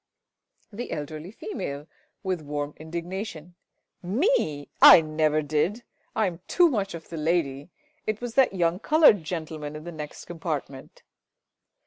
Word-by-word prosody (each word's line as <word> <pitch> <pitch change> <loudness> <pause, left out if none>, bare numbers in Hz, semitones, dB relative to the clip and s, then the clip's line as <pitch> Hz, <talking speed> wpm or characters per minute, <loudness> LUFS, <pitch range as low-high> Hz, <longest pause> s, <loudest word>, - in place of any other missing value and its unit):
The 240 +4 -5
Elderly 155 +3 -5
Female 150 -10 -6 0.4
(with 185 -4 -1
warm 145 0 -4
indignation). 170 +1 -6 0.5
Me? 185 - 0
I - - +11
never 155 0 +1
did! 155 +10 0 0.3
I 220 - +2
am 175 -3 -3
too 350 -1 +5
much 200 - -2
of 160 - -10
the 165 - -6
lady. 150 -2 -1 0.4
It 215 0 -1
was 245 -1 -5
that 260 -6 +4
young 175 0 +1
coloured 295 - +5
gentleman 155 -3 -5
in 155 - -8
the 175 - -7
next 150 -2 -8
compartment. 155 -5 -6
165 Hz, 135 wpm, -26 LUFS, 150-195 Hz, 0.5 s, I